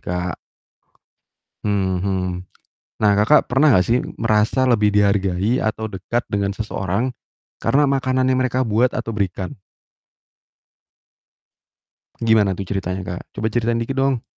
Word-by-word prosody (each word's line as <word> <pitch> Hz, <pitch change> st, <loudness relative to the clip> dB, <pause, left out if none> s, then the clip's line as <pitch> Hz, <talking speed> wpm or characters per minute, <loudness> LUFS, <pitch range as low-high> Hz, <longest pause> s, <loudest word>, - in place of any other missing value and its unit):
Kak. 90 Hz, -1 st, -3 dB, 1.3 s
hmm 95 Hz, -2 st, +1 dB
hmm. 95 Hz, -1 st, -1 dB, 0.8 s
Nah, 105 Hz, -1 st, +4 dB
Kakak 110 Hz, +9 st, +4 dB
pernah 135 Hz, +3 st, +4 dB
nggak 90 Hz, -, +3 dB
sih 120 Hz, +2 st, +2 dB, 0.2 s
merasa 110 Hz, +4 st, +2 dB
lebih 105 Hz, -4 st, +3 dB
dihargai 100 Hz, +2 st, +2 dB
atau 110 Hz, 0 st, -2 dB
dekat 100 Hz, +5 st, -2 dB
dengan 100 Hz, -1 st, -1 dB
seseorang 100 Hz, +2 st, -2 dB, 0.5 s
karena 145 Hz, +1 st, +2 dB
makanan 130 Hz, -1 st, +1 dB
yang 130 Hz, -, +2 dB
mereka 130 Hz, 0 st, 0 dB
buat 120 Hz, +1 st, +2 dB
atau 115 Hz, -1 st, -4 dB
berikan? 95 Hz, -2 st, -3 dB, 2.7 s
Gimana 110 Hz, -4 st, +3 dB
tuh 100 Hz, -, -5 dB
ceritanya, 95 Hz, -1 st, -3 dB
Kak? 90 Hz, -1 st, -6 dB
Coba 110 Hz, -, -2 dB
ceritain 115 Hz, +1 st, 0 dB
dikit 135 Hz, +3 st, -4 dB
dong. 135 Hz, -3 st, +1 dB
105 Hz, 125 wpm, -20 LUFS, 95-125 Hz, 2.7 s, Nah